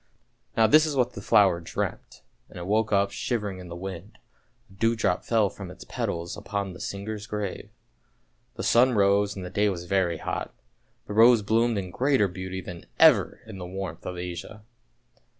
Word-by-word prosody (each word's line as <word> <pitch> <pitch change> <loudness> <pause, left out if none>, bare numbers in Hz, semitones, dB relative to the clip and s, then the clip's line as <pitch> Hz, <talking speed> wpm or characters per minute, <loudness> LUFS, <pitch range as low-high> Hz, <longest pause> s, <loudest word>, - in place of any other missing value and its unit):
" - - -36
Now 110 - +6
this 155 +6 +6
is 150 - -2
what 125 -2 +1
the 100 - -7
flower 95 -4 +4
dreamt, 85 - -5 0.3
and - - -12
it 85 - -6
woke 110 +3 +1
up 100 -1 +2
shiver 105 -5 -2
ing 95 - -9
in 90 - -9
the 85 - -8
wind; 95 +2 -8 0.5
a 95 - -20
dew 115 +4 +1
drop 95 -5 0
fell 110 -3 +2
from 95 -1 -8
its 90 - -11
petals 85 0 -4
upon 100 -2 -4
the 90 - -11
singer's 105 +2 -5
grave. 105 -3 -4 0.9
The - - -5
sun 125 +2 +4
rose 100 -1 +3
and 95 -2 -6
the 90 - -7
day 105 0 +2
was 90 -3 -4
very 90 -2 +1
hot, - - -4 0.5
the 105 - -6
rose 115 0 +6
bloomed 115 +2 +2
in 95 -2 -4
greater 130 -1 +2
beauty 95 +1 -6
than 90 -2 -9
ever - - +5
in 105 -3 -9
the 90 - -6
warmth 95 -3 -6
of 90 - -5
Asia. 90 +4 -7
100 Hz, 195 wpm, -26 LUFS, 90-110 Hz, 0.9 s, Now